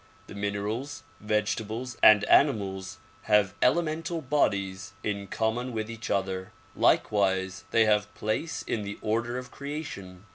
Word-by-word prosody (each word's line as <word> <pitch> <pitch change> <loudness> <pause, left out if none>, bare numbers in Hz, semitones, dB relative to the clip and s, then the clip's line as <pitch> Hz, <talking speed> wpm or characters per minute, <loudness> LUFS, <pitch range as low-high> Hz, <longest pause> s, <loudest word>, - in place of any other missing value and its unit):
The - - -11
minerals, 105 +7 -3 0.2
vege 105 -1 +1
tables 115 +3 -5
and 105 -1 +8
animals 100 -9 +2 0.3
have 105 -2 +3
elemental 165 +4 +1
bodies 100 -10 0
in 100 -1 -3
common 120 +4 -1
with 110 0 -3
each 115 +1 -7
other. 95 +1 -2 0.2
Likewise 95 -3 +2
they 115 -1 +4
have 105 -1 +2
place 160 +10 -2
in 110 - -2
the 100 0 -5
order 115 +3 -1
of 125 0 -7
creation. 110 - -7
105 Hz, 135 wpm, -28 LUFS, 100-125 Hz, 0.3 s, and